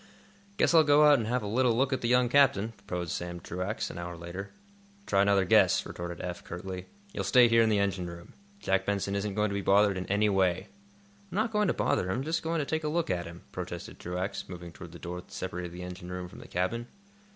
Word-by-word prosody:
"Guess - - +3
I'll 160 -1 +8
go 150 0 +6
out 145 -3 +7
and 110 - -2
have 125 0 0
a - - -3
little 120 +2 +2
look 135 +2 +2
at 130 - -1
the 120 - 0
young 125 +1 +4
captain," 120 -5 +4 0.2
proposed 90 -3 -3
Sam 85 0 -4
Truax, 90 +6 -3
an - - -8
hour 85 0 -6
later. 85 +4 -7 0.6
"Try 100 - +3
another 100 -1 +3
guess," - - +4
retorted 85 0 -6
Eph, 90 -1 -5
curtly. 90 +1 -6 0.3
"You'll - - -2
stay 125 -2 +6
here 115 0 +5
in 110 - +4
the 105 - +3
engine 100 -3 0
room. 85 0 -10 0.3
Jack 95 - +1
Benson 100 -1 0
isn't 100 0 -2
going 105 -1 +1
to - - -2
be 100 - -1
bothered 100 0 +4
in 90 - -5
any 105 +2 +2
way." 95 -1 +1 0.6
"I'm - - -6
not 220 +3 +1
going 210 -2 +2
to - - +2
bother 90 - +1
him; 110 +8 -1
just 160 +3 -1
going 165 +1 -1
to 150 - 0
take 160 +2 -2
a - - -1
look 160 - 0
at 85 -2 -2
him," 85 +1 -11
protested - - -6
Truax, 90 +3 -4
moving 85 -2 -8
toward 85 0 -11
the 85 - -10
door 90 +1 -6
that - - -23
separated 90 -1 -5
the 90 +1 -8
engine 90 0 -8
room 90 0 -5
from - - -13
the - - -11
cabin. 115 +7 -2
100 Hz, 240 wpm, -29 LUFS, 90-120 Hz, 0.6 s, I'll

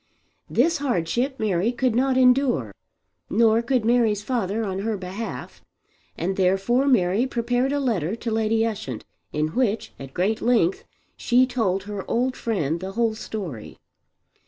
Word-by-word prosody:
This 320 +7 +2
hardship 250 - -1
Mary 210 0 +1
could 250 -1 0
not 260 +2 +2
endure, 250 - +3 0.6
nor 225 +1 +4
could 235 -1 0
Mary's 225 -3 +2
father 225 -3 -1
on 190 -1 -3
her 215 +1 -2
behalf, 190 +4 -6 0.6
and 190 +3 -2
therefore 195 +8 +2
Mary 210 -1 +3
prepared 245 +1 0
a 285 - 0
letter 215 - 0
to 230 0 -4
Lady 225 0 +1
Ushant 205 - -4 0.3
in 150 +1 0
which, 225 +3 -1
at 135 -1 -10
great 205 +5 0
length, 225 -7 +2 0.3
she 250 +1 +3
told 215 -7 -1
her 205 -1 -5
old 250 +2 0
friend 170 -8 -1
the 190 +2 -6
whole 230 0 +1
story. 185 - -7
220 Hz, 145 wpm, -24 LUFS, 190-245 Hz, 0.6 s, nor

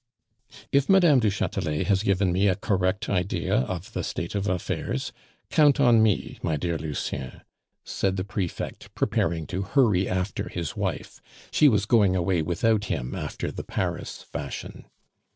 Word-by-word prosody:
"If 140 0 +2
Mme. 175 -8 +6
du 110 -3 +2
Chatelet 75 -6 -1
has 100 -2 +2
given 100 -3 +2
me 95 +3 +2
a 95 - +3
correct 95 +1 0
idea 90 -1 -1
of 85 +8 -3
the - - -2
state 85 - -4
of 100 0 -1
affairs, 90 -3 -2 0.4
count 150 -2 +5
on 120 -5 +6
me, 110 -3 +1
my 80 - 0
dear 85 +2 -1
Lucien," 70 -4 -4 0.4
said 95 -1 -1
the 95 - -1
prefect, 100 -3 -5
preparing 80 -1 0
to 95 +6 -3
hurry 100 -3 +2
after 90 0 -2
his 85 -3 -4
wife. - - -4 0.3
She 150 - +6
was 105 -4 +2
going 105 -5 +4
away 90 -1 +1
without 105 +7 +1
him, 65 -9 -3
after - - -4
the - - -6
Paris - - -4
fashion. 70 -1 -7
95 Hz, 155 wpm, -26 LUFS, 85-110 Hz, 0.4 s, Mme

